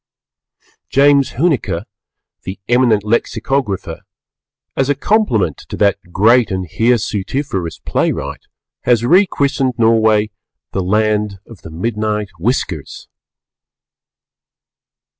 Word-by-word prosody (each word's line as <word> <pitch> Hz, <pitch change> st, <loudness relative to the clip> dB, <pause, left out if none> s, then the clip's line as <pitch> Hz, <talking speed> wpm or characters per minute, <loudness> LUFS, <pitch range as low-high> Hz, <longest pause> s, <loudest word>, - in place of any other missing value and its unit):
James 140 Hz, 0 st, +4 dB
Huneker, 150 Hz, 0 st, 0 dB, 0.6 s
the 95 Hz, -, -7 dB
eminent 120 Hz, -4 st, +3 dB
Lexicographer, 110 Hz, 0 st, -1 dB, 0.7 s
as 135 Hz, 0 st, 0 dB
a 145 Hz, -, +2 dB
compliment 135 Hz, -, +1 dB
to -, -, -5 dB
that 100 Hz, -1 st, +2 dB
great 115 Hz, +6 st, +4 dB
and 95 Hz, -2 st, -3 dB
hirsutiferous 110 Hz, -, -1 dB
playwright, -, -, -2 dB, 0.4 s
has 120 Hz, -1 st, +3 dB
re 185 Hz, +9 st, +5 dB
christened 140 Hz, -4 st, 0 dB
Norway 110 Hz, -2 st, +3 dB, 0.4 s
"The 95 Hz, -, -1 dB
Land 105 Hz, +1 st, 0 dB
of 115 Hz, -5 st, -14 dB
the -, -, -10 dB
Midnight 105 Hz, +4 st, -2 dB
Whiskers." 95 Hz, -, -3 dB
110 Hz, 95 wpm, -17 LUFS, 100-130 Hz, 0.7 s, re